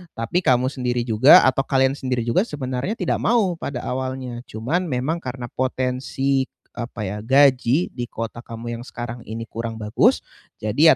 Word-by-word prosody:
tapi 115 Hz, +11 st, 0 dB
kamu 130 Hz, -4 st, +2 dB
sendiri 125 Hz, -2 st, -1 dB
juga 115 Hz, +4 st, +7 dB
atau 135 Hz, +1 st, +2 dB
kalian 135 Hz, 0 st, +2 dB
sendiri 125 Hz, -3 st, -1 dB
juga 150 Hz, -, +1 dB
sebenarnya 135 Hz, -, -3 dB
tidak -, -, -1 dB
mau 205 Hz, -7 st, +2 dB
pada 130 Hz, -3 st, -4 dB
awalnya. 130 Hz, -1 st, -4 dB
Cuman, 150 Hz, +12 st, -2 dB
memang 145 Hz, +5 st, -1 dB
karena 125 Hz, -3 st, -6 dB
potensi 130 Hz, +1 st, -1 dB, 0.2 s
apa 120 Hz, -2 st, -6 dB
ya, 105 Hz, +2 st, -4 dB
gaji 135 Hz, +4 st, +3 dB
di 120 Hz, -1 st, -5 dB
kota 115 Hz, +1 st, -6 dB
kamu 115 Hz, 0 st, -6 dB
yang -, -, -8 dB
sekarang 120 Hz, 0 st, -6 dB
ini 115 Hz, +1 st, -5 dB
kurang 115 Hz, 0 st, -5 dB
bagus, 105 Hz, -1 st, +2 dB, 0.3 s
jadi 140 Hz, +8 st, +4 dB
125 Hz, 160 wpm, -22 LUFS, 120-135 Hz, 0.3 s, juga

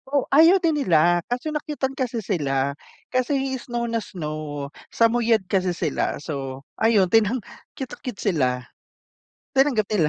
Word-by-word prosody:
O, 280 Hz, -1 st, +1 dB
ayaw 330 Hz, +6 st, +7 dB
din 325 Hz, -5 st, +1 dB
nila, 175 Hz, -, +4 dB
kaso 250 Hz, +6 st, -2 dB
nakyutan 295 Hz, -3 st, -2 dB
kasi 245 Hz, -5 st, -3 dB
sila. 140 Hz, -7 st, 0 dB, 0.4 s
Kasi 255 Hz, +2 st, +1 dB, 0.2 s
snow 240 Hz, -1 st, -3 dB
na 230 Hz, -1 st, -1 dB
snow, 150 Hz, -6 st, -5 dB, 0.2 s
samuyad 230 Hz, -2 st, +2 dB
kasi 185 Hz, -1 st, 0 dB
sila. 155 Hz, -5 st, -1 dB
So, 135 Hz, -3 st, -6 dB, 0.2 s
ayun, 220 Hz, -3 st, +5 dB
tinang 225 Hz, +2 st, +4 dB, 0.4 s
cute 265 Hz, -2 st, -5 dB
na -, -, -9 dB
cute 245 Hz, -5 st, -5 dB
sila, 160 Hz, -10 st, +2 dB, 1.1 s
tinanggap 265 Hz, -7 st, +3 dB
nila. 180 Hz, -8 st, +2 dB
220 Hz, 145 wpm, -23 LUFS, 155-255 Hz, 1.1 s, ayaw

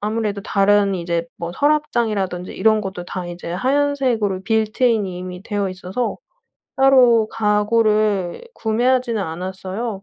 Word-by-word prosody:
아무래도 210 Hz, -1 st, -2 dB
다른 200 Hz, -1 st, +2 dB
이제 170 Hz, -1 st, -2 dB
뭐 170 Hz, 0 st, -5 dB
서랍장이라든지 225 Hz, -10 st, 0 dB
이런 220 Hz, -1 st, +2 dB
것도 190 Hz, -3 st, -6 dB
다 180 Hz, 0 st, -5 dB
이제 175 Hz, -1 st, -7 dB
하얀색으로 255 Hz, -3 st, 0 dB
빌트인이 220 Hz, -2 st, +1 dB
이미 180 Hz, 0 st, -7 dB
되어 205 Hz, -2 st, -2 dB
있어서 185 Hz, +6 st, -3 dB, 0.6 s
따로 250 Hz, -5 st, +5 dB
가구를 210 Hz, -, +1 dB
구매하지는 240 Hz, 0 st, +1 dB
않았어요. 190 Hz, +5 st, -5 dB
210 Hz, 315 characters per minute, -20 LUFS, 185-230 Hz, 0.6 s, 따로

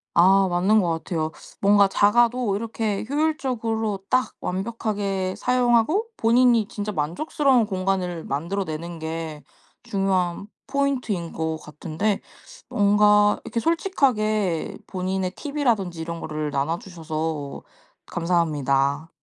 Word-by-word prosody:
아 190 Hz, +3 st, +6 dB
맞는 185 Hz, +5 st, +3 dB
것 180 Hz, -4 st, +1 dB
같아요. 160 Hz, -1 st, -2 dB, 0.3 s
뭔가 200 Hz, 0 st, +5 dB
작아도 235 Hz, +2 st, +3 dB
이렇게 220 Hz, -1 st, -2 dB
효율적으로 245 Hz, -, -1 dB
딱 255 Hz, 0 st, +1 dB
완벽하게 195 Hz, -1 st, -2 dB
사용하고 250 Hz, -, +2 dB
본인이 235 Hz, -1 st, +4 dB
진짜 210 Hz, 0 st, -4 dB
만족스러운 240 Hz, -, +1 dB
공간을 185 Hz, -4 st, -2 dB
만들어 170 Hz, +8 st, -2 dB
내는 165 Hz, 0 st, -6 dB
게 160 Hz, -2 st, -5 dB, 0.4 s
중요한 190 Hz, -2 st, -1 dB, 0.2 s
포인트인 255 Hz, -, -1 dB
것 160 Hz, 0 st, -2 dB
같은데 160 Hz, +7 st, -3 dB, 0.5 s
뭔가 205 Hz, 0 st, +4 dB
이렇게 230 Hz, 0 st, -3 dB
솔직하게 220 Hz, -, 0 dB
본인의 185 Hz, 0 st, -2 dB
팁 290 Hz, 0 st, -6 dB
이라든지 205 Hz, -, +1 dB
이런 170 Hz, +1 st, -5 dB
거를 155 Hz, -2 st, -3 dB
나눠 145 Hz, +4 st, 0 dB
주셔서 160 Hz, -5 st, -5 dB, 0.4 s
감사합니다. 150 Hz, -4 st, 0 dB
195 Hz, 280 characters per minute, -24 LUFS, 165-225 Hz, 0.5 s, 아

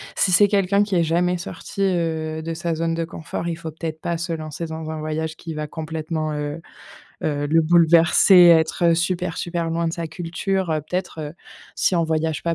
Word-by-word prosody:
si 185 Hz, -, +2 dB
c'est 205 Hz, +3 st, +6 dB
quelqu'un 200 Hz, 0 st, +2 dB
qui 205 Hz, -2 st, -2 dB
est 170 Hz, -, +3 dB
jamais 175 Hz, +2 st, +1 dB
sorti, 175 Hz, +3 st, -7 dB
heu, 160 Hz, -4 st, -1 dB
de 165 Hz, +1 st, -4 dB
sa 170 Hz, 0 st, -2 dB
zone 165 Hz, +1 st, -1 dB
de 165 Hz, 0 st, -1 dB
confort, 160 Hz, +1 st, -6 dB
il 165 Hz, -, -2 dB
faut 165 Hz, -1 st, -6 dB
peut-être 160 Hz, 0 st, -6 dB
pas 170 Hz, -1 st, -2 dB
se 170 Hz, +1 st, -4 dB
lancer 155 Hz, +1 st, -5 dB
dans 160 Hz, -1 st, -6 dB
un 155 Hz, -, -5 dB
voyage 155 Hz, +1 st, -3 dB
qui 165 Hz, -2 st, -7 dB
va 150 Hz, 0 st, -4 dB
complètement, 155 Hz, 0 st, -4 dB
heu 150 Hz, +2 st, -4 dB, 0.6 s
heu, 145 Hz, -1 st, -1 dB
le 165 Hz, +2 st, +3 dB
bouleverser, 170 Hz, +3 st, +5 dB
être 170 Hz, 0 st, +4 dB
super 175 Hz, 0 st, -1 dB
super 170 Hz, -1 st, -2 dB
loin 165 Hz, 0 st, 0 dB
de 165 Hz, -, -4 dB
sa 170 Hz, -1 st, -4 dB
culture. 175 Hz, +2 st, -2 dB
Heu, 155 Hz, -1 st, +1 dB
peut-être, 180 Hz, +1 st, -4 dB
heu, 150 Hz, -1 st, -5 dB, 0.4 s
si 185 Hz, -, +1 dB
on 170 Hz, -, +2 dB
voyage 160 Hz, -1 st, -1 dB
pas 170 Hz, 0 st, 0 dB
165 Hz, 205 wpm, -22 LUFS, 160-175 Hz, 0.6 s, c'est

